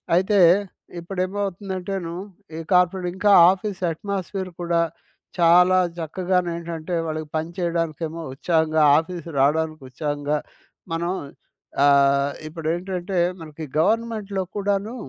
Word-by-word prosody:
అయితే 190 +3 +3 0.6
ఇప్పుడేమవుతుందంటే‌ను 190 -1 -3 0.4
ఈ - - -4
కార్పొరేట్ 180 0 +3
ఇంకా 205 +1 +3 0.2
ఆఫీస్ 195 0 -4
అట్‌మోస్‌స్ఫియర్ 190 +1 -4
కూడా, 170 -1 +1 0.6
చాలా 180 +2 +6 0.2
చక్కగానేంటంటే 170 -1 -2
వాళ్ళకి 155 0 -4
పని 160 +2 -3
చేయడానికేమో 165 -2 -2
ఉత్సాహంగా, 160 +1 +1 0.2
ఆఫీస్ 170 0 -7
రావడానికి 155 +1 +1
ఉత్సాహంగా, 145 +2 -2 0.6
మనం 170 +2 -1 0.7
ఆహ్, 140 0 +4 0.2
ఇప్పుడేంటంటే 175 +3 -3 0.2
మనకి 155 0 -8
గవర్నమెంట్‌లో 215 -1 0
కూడాను, 205 +3 -1
175 Hz, 90 wpm, -23 LUFS, 160-190 Hz, 0.7 s, చాలా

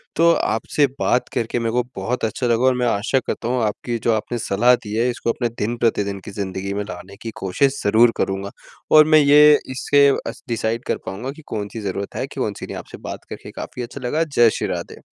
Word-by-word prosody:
तो 170 +1 +5
आपसे 115 +5 +1
बात 125 - +1
करके 115 +1 -1
मैं 115 -1 -1
को 125 +1 +1
बहुत 125 0 -2
अच्छा 110 +3 -2
लगा 120 +1 +2
और 130 - +5
मैं 125 -1 +1
आशा 115 +4 +1
करता 115 - -3
हूँ 125 0 0
आपकी 110 +3 -2
जो 115 - +3
आपने 110 +2 -2
सलाह 120 +3 +3
दी 105 -2 -6
है 120 +3 +2
इसको 120 -1 -1
अपने 120 0 -2
दिन-प्रतिदिन 105 -3 0
की - - -7
ज़िंदगी 100 -1 -4
में 105 +1 -2
लाने 100 -1 -9
की 115 - -5
कोशिश 135 +9 +1
ज़रूर 110 +3 +5
करूँगा। 95 +1 -2 0.4
और 155 0 +8
मैं 155 0 +6
ये 150 +1 +7
इससे 140 +2 +4 0.2
अस - - -7
डिसाइड 115 0 -2
कर - - 0
पाऊँगा 110 +8 -5
कि 155 +3 -13
कौन-सी 105 +1 -5
ज़रूरत 100 0 -4
है - - -2
कि - - -9
कौन-सी - - -3
नहीं, - - -7
आपसे - - -9
बात - - -8
करके - - -9
काफ़ी 125 - -7
अच्छा 125 +3 -8
लगा। 155 +6 +1
जय 130 -7 +4
श्री - - -2
राधे। - - -5
115 Hz, 220 wpm, -21 LUFS, 105-130 Hz, 0.4 s, और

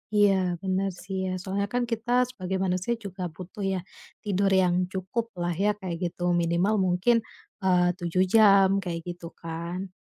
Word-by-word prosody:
Iya, 205 -1 +5 0.3
bener 190 +1 0
sih 195 0 -5
ya, - - -2
soalnya 200 +1 -2
kan 245 - +1
kita 230 +1 -2 0.2
sebagai 190 -6 -4
manusia 185 +4 0
juga 195 -1 -7
butuh 185 +3 -10
ya - - 0 0.5
tidur 200 -1 +1
yang 175 -1 +2 0.2
cukuplah 190 -1 -3
ya, 210 - +4
kayak 185 -4 -4
gitu, 175 0 -4 0.2
minimal 170 +5 +1
mungkin, 180 +7 +3 0.5
eee, 180 -1 +4
7 175 +2 +1
jam, 200 -3 +7 0.2
kayak 170 -2 -3
gitu 175 -1 -6
kan. 170 +3 -5
185 Hz, 155 wpm, -27 LUFS, 175-200 Hz, 0.5 s, jam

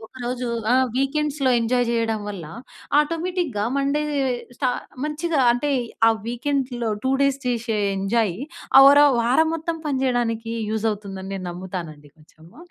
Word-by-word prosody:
ఒకరోజు 250 +1 -5 0.2
ఆ! - - +5 0.2
వీకెండ్స్‌లో 275 +1 0
ఎంజాయ్ 245 +2 +1
జేయడం 230 -2 0
వల్ల 195 -5 -6 0.5
ఆటోమేటిక్‌గా 330 - -1
మండే 280 +2 +1 0.5
స్ట 275 - -5 0.4
మంచిగా 310 +1 -1
అంటే 245 +5 -1 0.4
ఆ - - +8 0.2
వీకెండ్‌లో 245 -1 -2
2 260 - 0
డేస్ 275 -1 +2
చేశె 235 -2 -1 0.2
ఎంజాయ్ 195 0 0 0.4
ఆ - - +11
వర 285 +1 +8 0.2
వారం 255 +7 +3
మొత్తం 330 +1 -3
పనిజేయడానికి 245 -4 -1 0.2
యూజ్ 220 0 -2
అవుతుందని 195 -2 -6
నేను 190 -1 -5
నమ్ముతానండి 175 -5 -7
కొంచెము. 160 +2 -20
245 Hz, 130 wpm, -23 LUFS, 215-280 Hz, 0.5 s, ఆ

